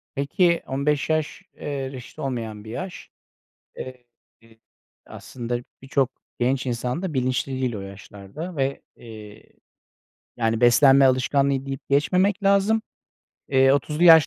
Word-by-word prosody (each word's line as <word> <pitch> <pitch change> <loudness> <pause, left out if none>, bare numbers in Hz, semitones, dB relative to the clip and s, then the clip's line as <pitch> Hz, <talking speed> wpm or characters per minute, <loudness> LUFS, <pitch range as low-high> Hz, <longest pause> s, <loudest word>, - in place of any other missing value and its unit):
Peki, 170 +5 +2
15 140 +2 0
yaş, 155 -1 -1
eee, 140 -2 -4
reşit 130 +3 -10
olmayan 115 -6 -4
bir 110 - -10
yaş. 185 +8 -7 0.7
Eee, 125 -1 -8 1.0
aslında 120 -1 -5 0.2
birçok 135 -1 +1 0.3
genç 130 +2 0
insan 125 +7 -2
da 175 -6 -3
bilinçli 130 +1 0
değil 130 -3 -1
o - - -5
yaşlarda 100 - -9
ve, 135 0 -1
eee, 110 -2 -12 0.9
yani, 115 0 0
beslenme 135 +3 +6
alışkanlığı 135 +1 +2
deyip 135 0 -7
geçmemek 185 +8 +2
lazım. 200 +3 +3 0.7
Eee, 135 0 +5
30'lu 150 +4 +1
yaş 160 -3 +9
135 Hz, 120 wpm, -24 LUFS, 120-150 Hz, 1.0 s, yaş